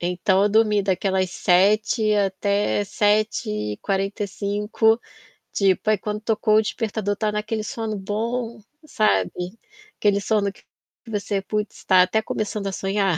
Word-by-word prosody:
Então 180 Hz, +2 st, +1 dB
eu 205 Hz, -, +4 dB
dormi 210 Hz, -1 st, +3 dB
daquelas 190 Hz, -1 st, 0 dB
7h 210 Hz, +5 st, +2 dB
até 200 Hz, +1 st, 0 dB
7h45. 205 Hz, -, 0 dB, 0.5 s
Tipo, 195 Hz, +2 st, +2 dB
aí 215 Hz, -, +4 dB
quando 210 Hz, 0 st, -4 dB
tocou 215 Hz, 0 st, +1 dB
o -, -, +6 dB
despertador, 215 Hz, -2 st, -2 dB
estava 210 Hz, +1 st, -2 dB
naquele 215 Hz, +1 st, -2 dB
sono 225 Hz, -2 st, -4 dB
bom, 230 Hz, +4 st, -3 dB, 0.3 s
sabe, 95 Hz, -, +1 dB, 0.7 s
aquele 205 Hz, -1 st, +2 dB
sono 200 Hz, -1 st, +1 dB
que -, -, -21 dB, 0.4 s
você, 205 Hz, -2 st, -2 dB
putz, 210 Hz, +2 st, -4 dB
tá 185 Hz, -1 st, +6 dB
até 185 Hz, +4 st, +2 dB
começando 210 Hz, -1 st, -3 dB
a -, -, -2 dB
sonhar. 195 Hz, -2 st, 0 dB
205 Hz, 130 wpm, -23 LUFS, 195-215 Hz, 0.7 s, o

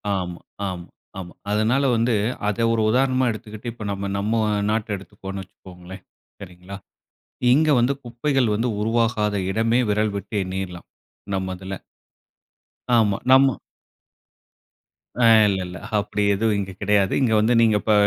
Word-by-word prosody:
ஆமா, 90 Hz, -2 st, -4 dB, 0.3 s
ஆமா, 90 Hz, -2 st, -6 dB, 0.3 s
ஆமா. 90 Hz, -2 st, -8 dB, 0.2 s
அதனால 110 Hz, +6 st, +2 dB
வந்து 115 Hz, 0 st, +1 dB, 0.3 s
அதை 115 Hz, +3 st, 0 dB
ஒரு 110 Hz, -, +1 dB
உதாரணமா 130 Hz, +1 st, +2 dB
எடுத்துக்கிட்டு. 110 Hz, +1 st, -7 dB
இப்போ 115 Hz, -, -9 dB
நாம 100 Hz, 0 st, -4 dB
நம்ம 105 Hz, +3 st, -1 dB, 0.4 s
நாட்ட 110 Hz, -1 st, -1 dB
எடுத்துக்குவோம்ன்னு 95 Hz, 0 st, -8 dB
வச்சுக்கோங்களேன் 90 Hz, 0 st, -13 dB, 0.4 s
சரிங்களா. 90 Hz, +1 st, -10 dB, 0.8 s
இங்க 155 Hz, +3 st, +3 dB
வந்து 125 Hz, +4 st, +2 dB
குப்பைகள் 120 Hz, -1 st, 0 dB
வந்து 115 Hz, +4 st, 0 dB
உருவாகாத 110 Hz, -2 st, +1 dB
இடமே 115 Hz, +4 st, +1 dB
விரல் 105 Hz, 0 st, +1 dB
விட்டு 100 Hz, +2 st, -7 dB
எண்ணீரலாம் 95 Hz, -1 st, -6 dB, 0.5 s
நம்ம 95 Hz, -1 st, -2 dB
இதுல. 95 Hz, +1 st, -7 dB, 1.2 s
ஆமா, 105 Hz, -3 st, +2 dB
நம்ம 135 Hz, -4 st, +5 dB, 1.6 s
அ 120 Hz, -, +1 dB, 0.2 s
இல்ல, 95 Hz, -1 st, 0 dB
இல்ல. 90 Hz, -1 st, -8 dB, 0.2 s
அப்படி 105 Hz, 0 st, -2 dB
எதுவும் 105 Hz, +1 st, +1 dB
இங்க 95 Hz, -1 st, -4 dB
கிடையாது. 100 Hz, -1 st, +2 dB
இங்க 115 Hz, -4 st, +2 dB
வந்து 115 Hz, +3 st, +2 dB
நீங்க 110 Hz, -2 st, +4 dB
இப்போ, 110 Hz, -, +1 dB
105 Hz, 135 wpm, -22 LUFS, 95-115 Hz, 1.6 s, நம்ம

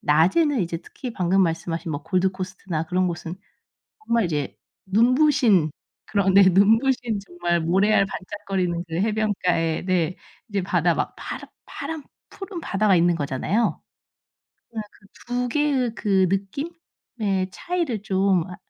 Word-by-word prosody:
낮에는 195 Hz, -, +3 dB
이제 170 Hz, -1 st, -2 dB
특히 245 Hz, +6 st, -8 dB
방금 190 Hz, 0 st, +2 dB
말씀하신 165 Hz, -1 st, -2 dB
뭐 145 Hz, 0 st, -4 dB
골드코스트나 185 Hz, -3 st, -2 dB
그런 180 Hz, +3 st, 0 dB
곳은 170 Hz, 0 st, -5 dB, 0.7 s
정말 235 Hz, -3 st, +2 dB
이제 145 Hz, -4 st, -3 dB, 0.3 s
눈부신 235 Hz, -, +4 dB, 0.4 s
그런 195 Hz, -2 st, +1 dB
네 200 Hz, -, +9 dB
눈부신 225 Hz, +5 st, +3 dB
정말 175 Hz, -1 st, -1 dB
모래알 195 Hz, +4 st, +3 dB
반짝거리는 185 Hz, -3 st, -3 dB
그 160 Hz, -, -6 dB
해변가에 190 Hz, -5 st, 0 dB
네 180 Hz, -2 st, +1 dB, 0.3 s
이제 205 Hz, -3 st, -1 dB
바다 175 Hz, -3 st, +2 dB
막 -, -, -2 dB
파라 -, -, -7 dB, 0.2 s
파란 320 Hz, -3 st, -6 dB, 0.3 s
푸른 390 Hz, -3 st, -7 dB
바다가 200 Hz, -4 st, +2 dB
있는 175 Hz, 0 st, +3 dB
거잖아요. 155 Hz, -, -1 dB, 0.9 s
네. 220 Hz, -, -3 dB
그 205 Hz, -, -22 dB, 0.2 s
2 245 Hz, 0 st, -1 dB
개의 270 Hz, -4 st, +1 dB
그 190 Hz, -3 st, +2 dB
느낌의 200 Hz, -, -3 dB
차이를 330 Hz, -, -2 dB
좀 190 Hz, -3 st, +2 dB
아 180 Hz, -, -7 dB
195 Hz, 275 characters per minute, -23 LUFS, 175-225 Hz, 0.9 s, 네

